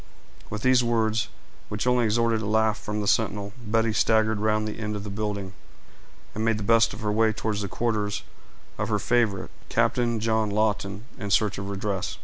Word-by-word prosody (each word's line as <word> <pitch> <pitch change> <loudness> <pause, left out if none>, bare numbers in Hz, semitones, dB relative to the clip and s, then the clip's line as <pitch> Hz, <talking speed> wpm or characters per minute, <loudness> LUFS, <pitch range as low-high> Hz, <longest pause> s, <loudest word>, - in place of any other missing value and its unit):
With 105 0 -5
these 130 -1 +5
words, 110 -1 +1 0.4
which 105 +2 -2
only 125 -1 +3
extorted 115 0 +2
a 105 - -3
laugh 110 0 +2
from 105 0 -3
the 100 - -3
sentinel, 105 -1 +1
Betty 115 0 +1
staggered 110 0 +3
round 110 0 +1
the 110 - -5
end 105 -1 -3
of 100 - -5
the 105 - -6
building, 100 -2 -3 0.8
and 110 - -3
made 115 -1 +2
the 105 - -4
best 115 +2 +4
of 105 - -9
her 105 -1 0
way 110 +1 +3
towards 110 -1 -2
the 100 - -2
quarters 105 -1 -1 0.6
of 110 +1 -1
her 105 - +2
favorite, 110 -1 +1 0.2
Captain 120 -2 +1
John 110 -1 +1
Lawton, 100 -1 0 0.2
in 105 -3 -4
search 100 0 +2
of 100 0 -5
redress. 100 -1 -3
110 Hz, 190 wpm, -26 LUFS, 105-115 Hz, 0.8 s, these